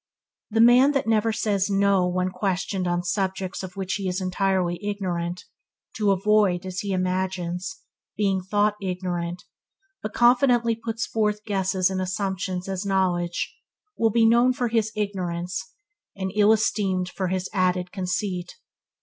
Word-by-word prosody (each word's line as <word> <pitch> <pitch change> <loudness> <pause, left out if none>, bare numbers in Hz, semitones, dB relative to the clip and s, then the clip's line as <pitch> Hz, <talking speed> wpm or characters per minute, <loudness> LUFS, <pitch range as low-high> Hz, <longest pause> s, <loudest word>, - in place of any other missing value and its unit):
The 225 +1 +2
man 250 +5 +6
that 275 -1 0
never 225 0 +2
says 205 -2 0
"no" 195 -2 +3
when 180 +1 -1
questioned 190 -1 -1
on 175 0 0
subjects 190 +1 -2
of 185 -1 -8
which 190 -1 -3
he 195 - -2
is 180 +1 -1
entirely 185 -1 0
ignorant, 180 -4 -3 0.5
to 210 -2 +2
avoid, 195 -2 +2
as 185 0 -4
he 200 - -3
imagines, 185 +1 -2 0.4
being 195 -2 +1
thought 205 +2 +1
ignorant, 180 -2 -3 0.6
but 215 - -4
confidently 240 -1 +4
puts 225 +1 -3
forward 210 -2 0
guesses 190 -2 +1
and 185 0 -1
assumptions 185 -1 -2
as 190 0 -3
knowledge, 180 -3 0 0.4
will 225 - +2
be 225 +1 +3
known 240 +3 +5
for 245 -1 -1
his 220 -1 +1
ignorance, 185 - -3 0.4
and 190 -1 -3
ill 210 0 +5
esteemed 195 -4 +1
for 190 0 -3
his 185 0 -2
added 180 -2 +1
conceit. 185 -1 -3
190 Hz, 145 wpm, -24 LUFS, 180-210 Hz, 0.6 s, man